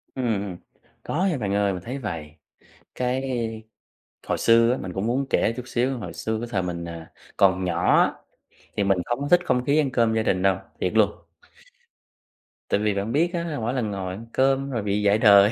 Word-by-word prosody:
Ừm, 130 - -2
ừm. 100 -5 -2 0.5
Có 180 +5 -1
nha 180 -6 +1
bạn 100 -5 -2
ơi. 100 -1 +2
Mình 90 - -5
thấy 125 +5 -5
vầy, 80 - -6 0.6
cái 125 +1 -1 1.1
hồi - - 0
xưa 115 +1 +5
á 125 - 0
mình 95 -6 -6
cũng 95 +4 -2
muốn 130 +4 0
kể 115 - +2
chút 125 - -4
xíu, 125 +2 0
hồi 115 - -7
xưa 110 0 -3
cái 120 - -5
thời 100 - +1
mình, 85 -1 -4
ờ 85 -1 -7 0.3
,còn 95 -1 +4
nhỏ 85 0 +2
á, - - +2 0.6
thì 100 - +2
mình 100 -1 +2
không 120 - -2
có 145 - -2
thích 175 - +6
không 125 0 +1
khí 145 +3 +3
ăn 145 -4 +2
cơm 115 -2 +2
gia 110 - +1
đình 95 -3 +1
đâu, 95 -1 +3 0.2
thiệt 90 - -1
luôn. 110 -2 +4 1.6
Tại - - +2
vì 105 0 +1
bạn 100 +3 -2
biết 165 +6 +2
á, 170 -3 -2
mỗi 115 +2 -1
lần 120 -5 -1
ngồi 95 -2 -4
ăn 110 +4 -9
cơm 135 +1 +2
rồi 115 -5 -2
bị 100 0 0
dạy 100 +1 +4
đời. 100 -2 +7
110 Hz, 215 wpm, -24 LUFS, 95-125 Hz, 1.6 s, đời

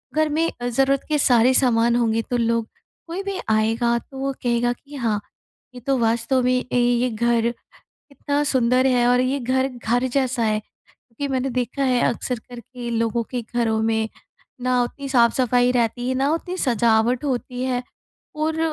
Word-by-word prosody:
घर 310 0 +2
में 320 +3 +1
अ, 245 - -1
ज़रूरत 270 +3 +1
के 305 - +2
सारे 250 -1 +4
सामान 235 -2 +3
होंगे 230 -1 +1
तो 245 - 0
लोग 230 -1 0 0.4
कोई 350 +4 -4
भी 395 -1 -4
आएगा 225 +2 +2
तो 270 - -14
वो 275 0 -1
कहेगा 240 0 +1
कि 285 +4 -15
हाँ, 225 -6 0 0.6
ये - - -7
तो 270 +2 0
वास्तव 230 +2 +1
में 250 - +2 0.2
ए, - - +1
ये 245 +1 +2
घर 235 +1 +1 0.6
कितना 285 0 -2
सुंदर 255 -1 +2
है 245 -2 +3
और 250 0 +4
ये 255 +2 0
घर, 260 +2 +1
घर 245 0 -1
जैसा 255 -1 0
है। 215 -1 +1
क्योंकि 245 +5 -10
मैंने 265 +1 -1
देखा 250 +2 -2
है 250 -2 +2
अक्सर 245 +1 -2
करके 245 0 -8
लोगों 230 0 0
के 245 -2 -3
घरों 225 -2 +1
में, 220 0 0 0.5
ना 250 0 +2
उतनी 275 +3 -5
साफ़-सफाई 245 0 +3
रहती 245 0 0
है, 260 - 0
ना 270 +3 +1
उतनी 355 +3 -3
सजावट 235 - +2
होती 250 -1 -3
है 250 -1 -1 0.5
और 315 +1 -1
245 Hz, 175 wpm, -22 LUFS, 235-265 Hz, 0.6 s, सारे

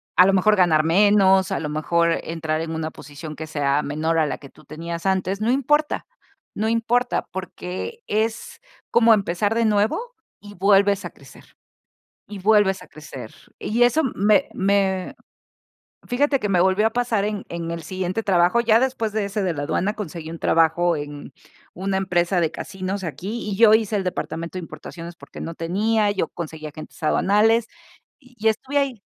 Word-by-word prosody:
A 180 +2 +7
lo 195 - +3
mejor 210 +3 +4
ganar 170 -5 +4
menos, 190 +1 +4
a - - 0
lo 155 - -3
mejor 170 +2 +1
entrar 160 -1 -2
en 165 0 -4
una 160 0 -3
posición 150 +2 -9
que 160 0 -7
sea 145 -1 0
menor 155 +3 -1
a 155 - +2
la 135 - -3
que 140 - -13
tú - - -19
tenías 170 +3 -6
antes, 190 +1 0
no 225 - +1
importa 295 +3 +1 0.5
no 220 +1 -1
importa, 230 +2 +1
porque 185 - -6
es 220 +2 -2 0.3
como 230 -1 +6
empezar 200 +1 0
de 230 0 +2
nuevo 220 - 0 0.3
y 205 0 -12
vuelves 200 +1 +3
a 175 - -4
crecer 140 - -18 0.7
y 205 -1 -8
vuelves 200 -1 +3
a - - -15
crecer. 135 -6 -10 0.3
Y 235 +3 +1
eso 245 +6 +3
me 205 +2 +3
me, 190 -1 +1 0.9
fíjate 275 +3 +1
que 210 -5 -2
me 180 -2 +3
volvió 190 +4 +3
a - - +2
pasar 240 -4 0
en 210 -1 -3
en 170 -1 -5
el 170 -1 -5
siguiente 185 +5 -3
trabajo. 185 +3 +3
Ya 225 -1 +4
después 235 -4 -1
de 215 -2 -1
ese 200 +1 -2
de 180 -3 0
la 145 - -4
aduana, 190 +7 -1
conseguí 170 -6 -6
un 165 - -7
trabajo 165 +1 +2
en 145 -1 -7 0.4
una 190 +2 -2
empresa 180 -1 +1
de 160 - +1
casinos 190 +2 -5
aquí, 200 +7 -5
y 195 - -2
yo 220 0 +6
hice 220 -1 +3
el 195 - -1
departamento 170 0 -4
de - - -6
importaciones 165 +2 -9
porque - - -12
no 165 - -5
tenía, 205 +6 +1
yo 190 -5 -1
conseguí 160 -2 -7
agentes 155 +2 -11
aduanales, 215 +8 +3 0.5
y 250 -3 -22
y 220 +1 +2
estuve 260 +6 -2
ahí. 270 -6 -1
190 Hz, 180 wpm, -22 LUFS, 165-215 Hz, 0.9 s, A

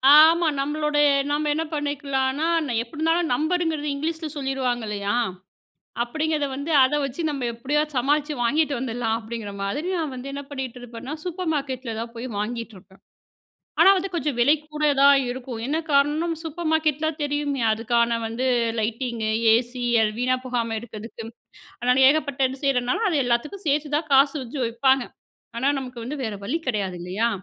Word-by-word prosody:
ஆமா, 325 +2 +7
நம்மளோட 300 +1 -1 0.3
நம்ம 295 +1 0
என்ன 320 - -1
பண்ணிக்கலானா 285 0 -1 0.3
எப்டி 235 +6 -9
இருந்தாலும் 325 +1 +1
நம்பருங்கிறது 315 +1 0
இங்கிலீஷில 320 +2 -3
சொல்லிருவாங்க 265 -3 -1
இல்லையா? 205 +1 -1 0.9
அப்படிங்கிறதை 305 +3 -1
வந்து 280 +4 -4
அதை 260 +3 +3
வச்சு 275 +4 -5
நம்ம 275 -4 -2
எப்படியாது 295 +6 -1
சமாளிச்சு 290 +4 +1
வாங்கிட்டு 290 +5 +2
வந்துர்லாம் 235 -2 -1
அப்படிங்கிற 220 -2 -6
மாதிரி 200 - -2
நான் 315 -5 -2
வந்து 255 +2 -6
என்ன 280 0 -5
பண்ணிட்டுருப்பேன்னா, 250 -1 -6
சூப்பர் 360 -1 -3
மார்க்கெட்டில 260 -5 -3
தான் 230 0 -6
போய் 235 +2 -5
வாங்கிட்டுருப்பேன். 210 -4 -6 0.8
ஆனா 390 - +8
வந்து 380 +1 -1
கொஞ்சம் 295 -5 -1
விலை 280 +5 +6 0.2
கூட 300 0 -2 0.2
தான் 280 0 +8
இருக்கும். 245 -2 -6
என்ன 295 +4 0 0.2
காரணம்? 300 +4 +2
சூப்பர் 325 +1 -4
மார்க்கெட்டில 310 -1 +1 0.2
தெரியுமே 290 -2 -1
அதுக்கான 235 +1 +1
வந்து 230 +3 -2 0.3
லைட்டிங்கு, 225 0 -2 0.2
ஏசி, 245 +1 -1 0.4
வீணா 255 +1 +2
போகாம 235 -3 -1
இருக்கிறதுக்கு. 225 0 -9 0.6
அதனால 250 +1 +3
ஏகப்பட்ட 285 -2 0
இது 265 +2 -9
செய்றதுனால 255 - +1
அதை 315 - +1
எல்லாத்துக்கும் 295 +12 -1
சேர்த்து 295 +1 0
தான் 310 0 -2
காசு 275 +2 +5
வச்சு 255 +3 -7
வைப்பாங்க. 260 +3 +2 0.5
ஆனா 265 +3 +1
நமக்கு 250 -2 -7
வந்து 275 +6 -4
வேற 220 -3 -3
வழி 275 +11 -1
கெடையாது 200 -7 -1
இல்லையா? 195 +6 0
270 Hz, 150 wpm, -24 LUFS, 235-300 Hz, 0.9 s, ஆனா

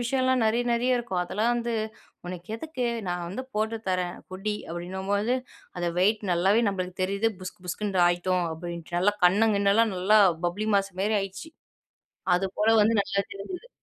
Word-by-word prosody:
விஷயம்லாம் 260 0 +1
நெறைய 225 +2 +2
நெறைய 245 +2 +2
இருக்கும். 190 -7 -2
அதெல்லாம் 215 +6 0
வந்து 235 0 -2 0.5
உனக்கு 180 0 -7
எதுக்கு? 285 -2 -4 0.2
நான் 175 -1 -2
வந்து 210 +8 -4
போட்டு 220 +2 0
தரேன் 180 -1 -1
குடி 195 +3 -3
அப்படின்னும்போது. 190 +7 -1 0.4
அத 175 - -2
வெயிட் 210 +4 +3
நல்லாவே 190 +6 +3
நம்மளுக்கு 185 -2 -4
தெரியுது. 200 +4 +1
புஸ்கு 185 0 -9
புஸ்குன்னு 195 +1 -1
ஆயிட்டோம் 175 +1 +1
அப்படின்ட்டு. 170 +1 -6
நல்லா 205 +3 +3
கண்ணு 205 +5 +5
கிண்ணலாம் 200 +2 +3
நல்லா 195 +4 +4 0.3
பப்ளி 205 +5 -2
மாஸ் 195 -1 +1
மாரி 210 +2 +2
ஆயிட்ச்சு. 195 +11 -6 0.9
அது 195 +2 0
போல 215 +1 +3
வந்து 225 +2 +3
நல்லா 200 0 -2
தெரிஞ்சுது. 360 - -8
200 Hz, 155 wpm, -27 LUFS, 180-225 Hz, 0.9 s, கண்ணு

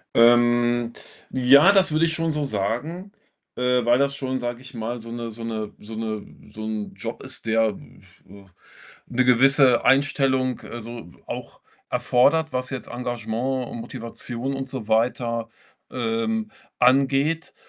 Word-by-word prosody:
Ähm, 120 0 +4 0.4
ja, 135 +8 +6
das 190 -5 +4
würde 155 +2 +3
ich 165 - +2
schon 165 -1 0
so 150 0 -2
sagen, 140 - -3 0.4
äh, 125 -1 +1
weil 120 0 +4
das 140 0 +1
schon, 130 -1 -3
sage 120 0 -4
ich 130 0 -13
mal, 115 +1 -4
so 115 +1 -9
'ne 120 -1 -5
so 115 +1 -8
'ne 110 -2 -4
so 110 +2 -9
'ne 110 -2 -4 0.2
so 110 - -8
'n 110 -1 -4
Job - - -6
ist, - - -7
der, 110 0 +3 0.6
äh, 100 +1 -14 0.6
'ne 130 +1 +1
gewisse 130 0 +5
Einstellung, 130 -1 +2
äh, 120 - -8
so 115 -5 -9
auch - - -7 0.3
erfordert, 155 +6 +2
was 130 +1 -2
jetzt 130 - -6
Engagement 120 +1 -3
und - - -7
Motivation 120 +2 -5
und 135 0 -4
so 125 -5 -6
weiter, 115 0 0 0.4
ähm, 125 - -1 0.3
angeht 135 +6 +2
125 Hz, 150 wpm, -23 LUFS, 115-135 Hz, 0.6 s, ja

